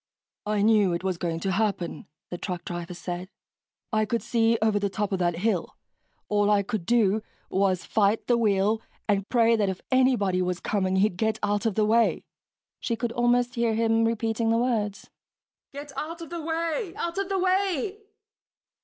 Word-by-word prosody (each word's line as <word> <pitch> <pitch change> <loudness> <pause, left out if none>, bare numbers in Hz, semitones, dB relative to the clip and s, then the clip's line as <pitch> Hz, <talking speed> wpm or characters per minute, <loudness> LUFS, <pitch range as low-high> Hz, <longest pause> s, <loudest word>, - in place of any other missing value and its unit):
"I 210 -1 +1
knew 210 -4 +4
it 170 - -3
was 185 -3 -1
going 165 -2 -2
to 190 - -1
happen," 195 -5 -1 0.2
the 175 - -3
truck 180 -3 -5
driver 175 0 -5
said, 180 +1 -5 0.6
"I 215 0 +2
couldn't 230 +2 -2
see 230 -1 +2
over 215 -1 +2
the 200 0 0
top 210 +1 -2
of 190 - -1
that 175 -1 +1
hill. 190 -2 -1 0.5
All 205 0 +2
I 205 -1 +3
could 200 -4 -4
do 220 -3 +3 0.3
was 190 -2 +1
fight 210 +1 +1
the 245 - +3
wheel 215 -1 +2 0.3
and 200 -1 0
pray 230 -2 +4
that 205 -3 +1
if 190 - -4
anybody 240 -8 +3
was 180 -1 -1
coming, 190 -2 0
he'd 190 -1 +2
get 220 +1 0
out 205 +2 +1
of 215 - -1
the 215 - +3
way." 225 +2 +2 0.5
She 235 - -1
could 235 0 -2
almost 240 +1 +2
hear 235 -2 +1
him 225 0 +2
repeating 225 0 0
the 230 - +3
words, 225 -4 -1 0.6
"Get 285 +1 -8
out 320 +5 -5
of 330 - -9
the 340 -1 -4
way, 330 +5 -2
out 340 +3 -3
of 395 0 -2
the 390 - 0
way...." 375 0 0
220 Hz, 185 wpm, -26 LUFS, 195-240 Hz, 0.6 s, knew